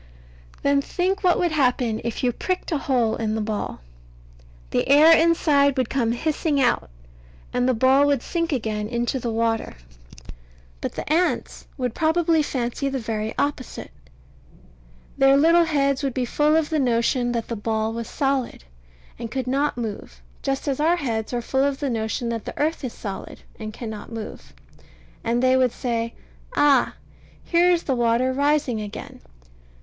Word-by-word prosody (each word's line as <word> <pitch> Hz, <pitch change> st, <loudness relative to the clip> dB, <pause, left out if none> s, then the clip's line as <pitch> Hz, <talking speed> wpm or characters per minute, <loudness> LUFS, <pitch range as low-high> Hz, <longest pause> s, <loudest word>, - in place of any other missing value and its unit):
Then 280 Hz, 0 st, +3 dB
think 375 Hz, +7 st, -1 dB
what 360 Hz, -1 st, +4 dB
would 350 Hz, -2 st, +1 dB
happen 250 Hz, -6 st, +1 dB
if 235 Hz, +1 st, -4 dB
you 250 Hz, -, +3 dB
pricked 365 Hz, +10 st, -3 dB
a 310 Hz, -, +1 dB
hole 245 Hz, -5 st, +1 dB
in 220 Hz, -1 st, -2 dB
the -, -, -1 dB
ball. 210 Hz, -, -3 dB, 0.9 s
The -, -, 0 dB
air 310 Hz, +4 st, +8 dB
inside 295 Hz, -4 st, +3 dB
would 255 Hz, -3 st, 0 dB
come 235 Hz, -4 st, +1 dB
hissing 300 Hz, +2 st, 0 dB
out, 260 Hz, -, +1 dB, 0.6 s
and 250 Hz, +1 st, +1 dB
the 255 Hz, -, +2 dB
ball 265 Hz, +4 st, +4 dB
would 280 Hz, -4 st, +1 dB
sink 335 Hz, -1 st, -2 dB
again 215 Hz, -5 st, -2 dB
into 240 Hz, +3 st, -1 dB
the 240 Hz, -, -3 dB
water. 225 Hz, 0 st, -1 dB, 1.1 s
But -, -, -3 dB
the -, -, -6 dB
ants 350 Hz, +2 st, -1 dB
would 250 Hz, -4 st, -2 dB
probably 325 Hz, 0 st, +2 dB
fancy 265 Hz, -1 st, -2 dB
the 270 Hz, -, -2 dB
very 220 Hz, -2 st, -3 dB
opposite. 285 Hz, -3 st, -3 dB, 1.3 s
Their 270 Hz, 0 st, +6 dB
little 335 Hz, +3 st, +5 dB
heads 280 Hz, -4 st, +1 dB
would 275 Hz, -3 st, -2 dB
be 255 Hz, -2 st, 0 dB
full 300 Hz, +5 st, +2 dB
of 320 Hz, -1 st, +1 dB
the 310 Hz, -, +1 dB
notion 245 Hz, -1 st, +1 dB
that 230 Hz, -1 st, -2 dB
the 235 Hz, -, -3 dB
ball 220 Hz, +1 st, -1 dB
was 230 Hz, 0 st, -5 dB
solid 270 Hz, -, -1 dB, 0.6 s
and 230 Hz, -, -5 dB
could 260 Hz, +1 st, -3 dB
not 275 Hz, +2 st, 0 dB
move, 220 Hz, -4 st, -6 dB, 0.2 s
just 270 Hz, +1 st, -2 dB
as 275 Hz, -1 st, -1 dB
our 325 Hz, +3 st, +3 dB
heads 225 Hz, -9 st, -3 dB
are 240 Hz, -1 st, -2 dB
full 265 Hz, +3 st, +1 dB
of 280 Hz, -1 st, 0 dB
the 280 Hz, -3 st, -1 dB
notion 225 Hz, +1 st, -2 dB
that 230 Hz, -2 st, -4 dB
the -, -, -7 dB
earth 310 Hz, +1 st, 0 dB
is 255 Hz, -, -3 dB
solid 195 Hz, -3 st, -7 dB, 0.2 s
and 215 Hz, -1 st, -5 dB
cannot 220 Hz, 0 st, -7 dB
move; 225 Hz, -2 st, -8 dB, 0.7 s
and 235 Hz, +2 st, 0 dB
they 255 Hz, 0 st, +4 dB
would 255 Hz, -2 st, +3 dB
say, 230 Hz, -2 st, -3 dB, 0.4 s
"Ah! 280 Hz, -4 st, +4 dB, 0.5 s
here 345 Hz, +1 st, +3 dB
is 345 Hz, -1 st, +2 dB
the 270 Hz, -, 0 dB
water 240 Hz, +1 st, +2 dB
rising 280 Hz, -4 st, +1 dB
again." 205 Hz, -1 st, -8 dB
260 Hz, 170 wpm, -23 LUFS, 230-290 Hz, 1.3 s, air